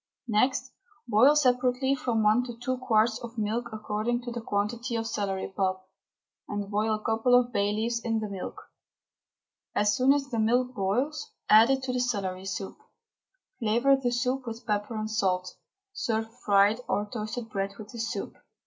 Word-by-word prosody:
Next 235 +4 +1 0.4
boil 240 +7 +6
separately 255 -1 +2
from 240 -5 0
one 215 +4 +4
to 240 -2 -8
two 255 +1 -2
quarts 225 -2 +2
of 235 0 -9
milk 225 +3 -1
according 220 +3 -2
to 240 - -5
the 235 0 -4
quantity 225 +3 -2
of 225 0 -1
celery 195 -3 -3
pulp, 185 -1 -1 0.6
and 205 0 -4
boil 215 +1 +1
a 215 - -8
couple 225 +3 +3
of 245 0 -3
bay 200 0 +1
leaves 230 +2 -1
in 230 -1 -1
the 215 - -3
milk. 195 -2 -7 1.1
As 210 0 +3
soon 255 +3 +4
as 280 -1 +1
the 230 - -1
milk 245 +3 +2
boils 255 +11 -1 0.2
add 220 +3 +8
it 265 -1 +1
to 255 -1 -2
the 250 - 0
celery 195 -6 -2
pulp, 195 -3 -7 0.8
flavour 240 +4 +3
the 265 -2 -1
soup 250 +2 -1
with 230 +1 -6
pepper 210 0 -1
and 215 0 -2
salt; 185 -4 0 0.4
serve 225 - -2
fried 205 +2 +3
or 205 - 0
toasted 220 +1 -5
bread 195 -1 -2
with 210 -1 -10
the 235 - -8
soup. 230 - -4
225 Hz, 175 wpm, -28 LUFS, 210-245 Hz, 1.1 s, add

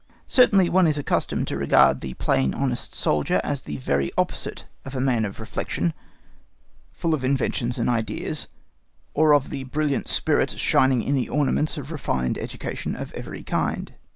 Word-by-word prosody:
Certainly 200 -8 +5
one 185 -1 +4
is 150 -1 +2
accustomed 145 - -1
to - - -2
regard 70 0 +4
the 65 -1 -6
plain 65 0 +1
honest 130 -3 -2
soldier 75 -1 +1
as 140 -2 -2
the 75 - -6
very 70 +1 0
opposite - - -1 0.2
of 135 - -8
the 130 - -2
man 125 -4 +2
of 100 - -7
reflection, 85 -1 -2 1.0
full 165 -1 -1
of 145 -4 -1
inventions 130 -2 0
and 115 - 0
ideas, 115 -3 -1 0.7
or 155 0 +4
of 145 -2 +3
the 135 -2 -4
brilliant 145 +1 -1
spirit - - +1
shining 130 -3 +3
in 140 - 0
the 130 -3 0
ornaments 150 +1 +1
of 145 +1 -6
refined 65 - -1
education - - -5
of - - -7
every - - -7
kind. - - -2
130 Hz, 165 wpm, -24 LUFS, 110-150 Hz, 1.0 s, Certainly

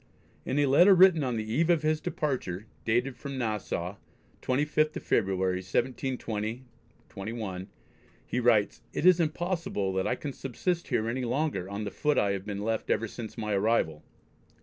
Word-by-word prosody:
In 135 - -1
a 145 - +4
letter 175 +9 +7
written 180 -4 +6
on 125 -3 -1
the 110 - -1
eve 155 +10 +1
of 165 -3 +3
his 155 0 +1
departure, 120 - -2 0.2
dated 120 +3 +1
from 140 -2 -6
Nassau, 105 -5 -2 0.4
25th 150 +3 +1
of - - -5
February, 95 -3 +1
1720/1, 110 -3 -4 0.6
he 125 - -2
writes: 115 -4 +3
"It - - -2
is 180 -1 +7
impossible 165 - -1
that 95 0 0
I 125 - +1
can 140 +1 -5
subsist 170 +8 -2
here 115 -4 0
any 125 +3 -2
longer 125 - -1
on 100 +2 -4
the 100 - -4
foot 150 -1 0
I 100 - +3
have 100 0 -4
been 100 -1 -3
left 110 0 -2
ever 115 +1 +1
since 110 +1 -8
my 105 -2 -2
arrival." 95 -7 +1
120 Hz, 165 wpm, -29 LUFS, 100-145 Hz, 0.6 s, letter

